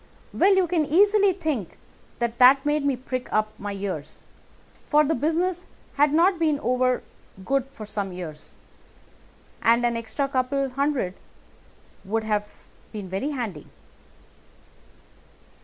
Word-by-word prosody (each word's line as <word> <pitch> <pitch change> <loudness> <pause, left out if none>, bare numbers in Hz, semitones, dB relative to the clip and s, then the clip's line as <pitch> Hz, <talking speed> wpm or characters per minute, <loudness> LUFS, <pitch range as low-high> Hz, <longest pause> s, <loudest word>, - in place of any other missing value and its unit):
"Well, 390 +1 +4
you 380 -1 +3
can 335 -2 +1
easily 400 +6 +4
think 310 - -3 0.4
that 235 -1 -2
that 265 +2 +7
made 295 0 +1
me 280 -2 +1
prick 255 0 -5
up 215 0 +1
my 205 0 -4
ears, 190 -7 -6 0.6
for 300 0 +4
the 305 +2 +1
business 340 +6 -1 0.3
has 290 +1 +4
not 340 +4 +3
been 310 -3 +1
over 255 +1 +1 0.4
good 270 +2 0
for 225 -5 -10
some 205 -2 -4
years, 170 -4 -8 1.1
and 235 +1 +4
an 240 -1 +1
extra 230 +5 -2
couple 275 +1 0
of 265 - -6
hundred 275 -8 -1 0.9
would 220 +3 -2
have 210 -1 -3 0.3
been 205 -4 -7
very 195 +10 -2
handy. 230 - -5
255 Hz, 135 wpm, -24 LUFS, 215-300 Hz, 1.1 s, that